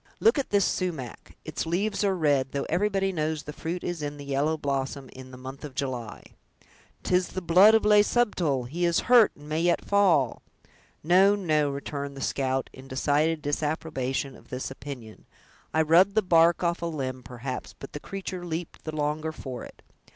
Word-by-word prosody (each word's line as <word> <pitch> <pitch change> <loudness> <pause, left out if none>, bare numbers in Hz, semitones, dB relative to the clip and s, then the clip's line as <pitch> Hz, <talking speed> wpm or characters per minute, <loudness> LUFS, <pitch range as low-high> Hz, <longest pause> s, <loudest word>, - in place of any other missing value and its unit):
Look 445 -9 +4
at 275 - -3
this 200 -2 +3
sumach; 160 - -3
its - - -4
leaves 200 +5 0
are 195 -2 +2
red, 145 -6 +1
though 140 - -1
everybody 195 +2 +1
knows 155 -3 -2
the 150 - -7
fruit 170 +4 -4
is 175 -3 -3
in 145 0 -4
the 145 - -9
yellow 140 +3 0
blossom 135 -1 -3
in 130 0 -11
the 130 - -11
month 130 +1 -9
of 145 -3 -8
July!" 125 -5 -4 0.8
"'Tis 180 0 +2
the - - -5
blood 185 +5 +6
of 220 - +2
Le 210 0 +7
Subtil! 180 - +1
he 170 +7 -3
is 170 -1 +3
hurt, 240 -3 +6
and 145 0 -14
may 155 +2 -1
yet 175 0 +1
fall!" 180 - +3 0.6
"No, 190 +5 +5
no," 155 -7 +1
returned 140 0 -5
the - - -7
scout, 135 -1 -1
in 130 +1 -12
decided 150 +4 +1
disapprobation 145 -3 -2
of - - -18
this 130 +1 -4
opinion, 130 -5 -9 0.4
"I 160 - +3
rubbed 180 +6 +5
the 220 - +3
bark 170 -1 +4
off 170 0 0
a 170 - -1
limb, 130 -5 -4
perhaps, 125 +1 -6
but 135 - -10
the 150 - -5
creature 190 0 -6
leaped 170 -1 -6
the 155 -1 -4
longer 155 +1 -1
for 130 -5 -7
it. - - -13
155 Hz, 190 wpm, -27 LUFS, 135-180 Hz, 0.8 s, Le